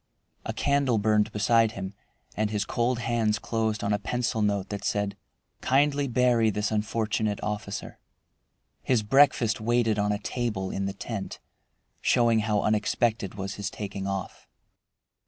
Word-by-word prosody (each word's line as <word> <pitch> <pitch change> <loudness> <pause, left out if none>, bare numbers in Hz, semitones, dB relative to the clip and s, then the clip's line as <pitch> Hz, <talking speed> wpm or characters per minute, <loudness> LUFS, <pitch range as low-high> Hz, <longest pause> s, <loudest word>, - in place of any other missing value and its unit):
A - - -2
candle 140 -4 +1
burned 105 0 +2
beside 110 +1 +3
him, 95 0 -6 0.4
and 105 0 0
his 105 -1 -1
cold 120 +1 0
hands 115 -2 +1
closed 110 -1 -2
on 100 - +1
a 105 - +1
pencil 120 0 -1
note 100 -2 0
that 100 -1 -5
said, 100 -1 -1 0.5
"Kindly 140 +1 +2
bury 120 -2 +3
this 105 +1 -1
unfortunate 110 -1 -1
officer." 105 -1 -4 0.8
His 120 -4 +1
breakfast 120 -2 +4
waited 115 -1 +2
on 105 0 +1
a 105 - 0
table 105 -3 -3
in 100 0 -2
the 100 - -3
tent, 100 0 -6 0.6
showing 115 -2 +3
how 105 -1 +1
unexpected 110 -1 0
was 100 0 -5
his 100 - -2
taking 100 -1 -5
off. 95 -1 -5
110 Hz, 145 wpm, -27 LUFS, 105-120 Hz, 0.8 s, breakfast